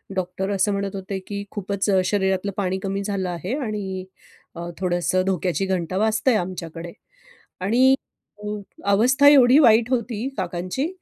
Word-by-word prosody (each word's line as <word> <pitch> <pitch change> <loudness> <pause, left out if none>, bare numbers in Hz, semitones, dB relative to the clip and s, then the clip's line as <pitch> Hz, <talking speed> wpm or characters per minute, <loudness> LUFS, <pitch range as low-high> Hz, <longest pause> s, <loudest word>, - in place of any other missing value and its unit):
Doctor 190 +1 -2
असं 200 +1 +1
म्हणत 200 0 -2
होते 195 0 -4
की 200 -1 -4
खूपच 200 0 -2
अ, 190 -2 +4
शरीरातलं 190 0 0
पाणी 190 -2 0
कमी 195 0 -2
झालं 195 -2 -2
आहे 180 +7 -3
आणि 205 -8 -4 0.5
अ, 170 +1 -6
थोडंसं 180 0 +1
धोक्याची 190 0 0
घंटा 185 -1 -2
वाजतंय 220 +3 +2
आमच्याकडे. 175 -3 -5 0.7
आणि 255 +7 +4 0.5
अ, - - -5 0.4
अवस्था 255 +7 +4
एवढी 270 0 +7
वाईट 235 -3 +5
होती 235 0 -1
काकांची 185 - -2
195 Hz, 140 wpm, -23 LUFS, 185-220 Hz, 0.7 s, एवढी